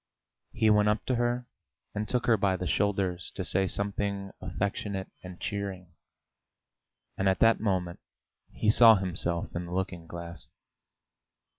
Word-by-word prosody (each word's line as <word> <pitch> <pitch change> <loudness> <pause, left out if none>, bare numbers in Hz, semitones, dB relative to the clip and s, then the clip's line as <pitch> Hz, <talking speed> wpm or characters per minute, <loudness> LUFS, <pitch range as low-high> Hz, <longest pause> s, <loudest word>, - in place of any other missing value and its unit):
He 110 -1 +3
went 105 0 +4
up 105 0 0
to 130 - +1
her 120 +1 0 0.5
and 105 +1 -3
took 125 -1 0
her 115 - +5
by 95 -2 +1
the 90 - -4
shoulders 95 -2 0
to 95 - -3
say 95 +2 +2
something 100 0 -2
affectionate 95 +1 -3
and 90 -1 -10
cheering, 95 -4 -5 1.3
and 95 0 +3
at 95 - +2
that 115 0 +4
moment 95 -5 -1 0.5
he 105 - +2
saw 115 0 +8
himself 90 -3 -2
in 85 0 -3
the 85 - -7
looking 90 -3 -3
glass. 85 -1 -8
95 Hz, 145 wpm, -29 LUFS, 90-105 Hz, 1.3 s, saw